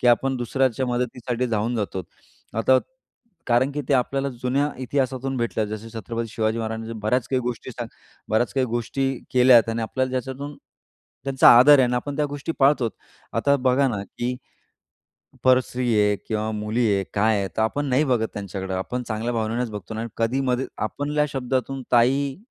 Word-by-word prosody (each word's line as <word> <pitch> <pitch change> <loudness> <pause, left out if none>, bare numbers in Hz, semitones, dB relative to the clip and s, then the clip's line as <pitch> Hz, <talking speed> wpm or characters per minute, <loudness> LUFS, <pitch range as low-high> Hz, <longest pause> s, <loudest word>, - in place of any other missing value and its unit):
की - - +1
आपण 130 +2 +3
दुसऱ्याच्या 130 +1 0
मदतीसाठी 125 0 -2
धावून 115 +1 -1
जातो 100 -3 -3 0.6
आता, 130 +3 +5 0.7
कारण 125 +3 +3
की 150 - -2
ते 140 - +4
आपल्याला 135 +2 0
जुन्या 130 +4 -1
इतिहासातून 130 0 -1
भेटल्या. 120 -2 -1
जसे 110 +2 -7
छत्रपती 115 0 -4
शिवाजी 110 +1 -1
महाराजांनी 110 0 -4
बऱ्याच 120 +4 0
काही 130 -1 +1
गोष्टी 125 +1 -4
सा 120 0 -5 0.4
बऱ्याच 110 +3 +1
काही 130 -2 +2
गोष्टी 120 +3 -1 0.2
केल्या 125 -1 +7
आणि 115 0 -2
आपल्याला 130 +3 -1
ज्याच्यातून 135 +3 -4 0.7
त्यांचा 135 -1 +5
आदर 145 +3 +8
आहे - - +6
आणि 125 0 0
आपण 140 +3 -3
त्या 150 -1 +1
गोष्टी 145 +3 -4
पाळतो. 135 -4 +3 0.4
आता, 140 0 +2
बघा 130 +1 +2
ना, 105 -5 -3
की 120 +5 -4 1.1
परस्त्री 125 -1 +2
आहे 105 0 +3
किंवा 110 0 -1
मुली 110 +3 0
आहे, 100 0 0
काय 105 +1 +3
आहे, 100 -1 -2
तर 110 - +2
आपण 145 +6 0
नाही 135 +3 +2
बघत 120 -5 +1
त्यांच्याकडं. 95 -1 -5
आपण 125 +7 -3
चांगल्या 110 +2 -2
भावनेनेच 115 +2 -1
बघतो 105 0 -7
ना. 110 +1 -3
कधीमध्ये 125 +2 0 0.2
आपल्या 150 +3 -1
शब्दातून 130 0 -2
ताई, 135 +3 +3
125 Hz, 165 wpm, -23 LUFS, 110-135 Hz, 1.1 s, आदर